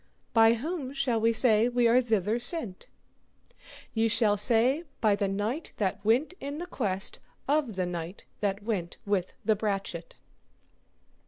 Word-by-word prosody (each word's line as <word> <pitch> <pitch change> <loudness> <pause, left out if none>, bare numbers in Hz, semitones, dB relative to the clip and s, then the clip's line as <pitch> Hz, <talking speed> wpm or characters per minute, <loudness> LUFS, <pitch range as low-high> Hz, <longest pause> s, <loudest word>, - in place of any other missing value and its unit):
By 225 0 +6
whom 280 +1 -4
shall 245 -5 0
we 230 +1 +4
say 225 -1 +4
are - - 0
we 245 0 +4
thither 220 -1 0
sent? 240 - -1 1.1
Ye 225 0 +2
shall 215 -2 +3
say 235 - +2 0.2
by 215 -2 +3
the 200 0 -1
knight 210 +10 -3
that 200 -1 -2
went 245 - +2
in 280 +1 -5
the 345 - -5
quest 195 - -1 0.3
of 280 -6 +1
the 185 -1 -1
knight 175 +1 -6
that 200 0 -2
went 195 -6 -3
with 200 -3 -1
the 220 - +3
brachet. 210 - -4
225 Hz, 150 wpm, -28 LUFS, 200-250 Hz, 1.1 s, By